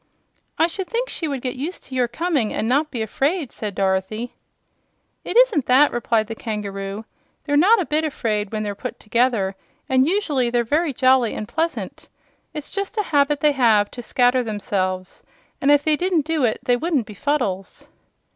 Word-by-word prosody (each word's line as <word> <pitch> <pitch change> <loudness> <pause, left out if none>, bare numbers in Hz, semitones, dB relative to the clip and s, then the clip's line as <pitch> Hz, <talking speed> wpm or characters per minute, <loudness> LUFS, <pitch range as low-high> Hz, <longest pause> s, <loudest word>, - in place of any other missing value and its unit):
"I 325 - +4
should 360 +2 -4
think 485 +2 -2
she 325 - -2
would 275 -3 -3
get 250 -1 -2
used 320 +8 -5
to 265 - -11
your 250 -2 +1
coming, 275 -2 -1
and 215 - -2
not 285 +5 +2
be 235 -6 -3
afraid," 290 - -1
said 210 -3 -5
Dorothy. 195 +5 -1 0.9
"It - - -2
isn't 475 - +4
that," 270 +4 +5
replied 230 -2 +1
the 225 - -6
kangaroo. 205 -2 -5 0.4
"They're 290 - -1
not 390 +10 +5
a 365 - 0
bit 305 +1 +1
afraid, 215 -9 -2
when 215 -1 -2
they're 205 -1 -3
put 250 +5 -7
together, 220 -4 +1 0.3
and 260 +1 +3
usually 310 -10 +1
they're 240 0 +1
very 300 +7 +1
jolly 255 -2 +3
and 215 - -5
pleasant. 325 +6 -3 0.4
It's 300 -2 -7
just 395 +3 -4
a 420 - +2
habit 290 -4 +1
they 300 - +5
have, 225 -7 +3
to 245 - -7
scatter 245 +1 +2
themselves, 190 -4 -3 0.4
and 275 - +2
if 290 0 +5
they 310 -1 +3
didn't 350 -2 0
do 315 -4 +1
it 220 - -1
they 245 -2 +2
wouldn't 300 -4 0
be 210 - -10
Fuddles." 205 -7 -2
255 Hz, 185 wpm, -22 LUFS, 215-305 Hz, 0.9 s, that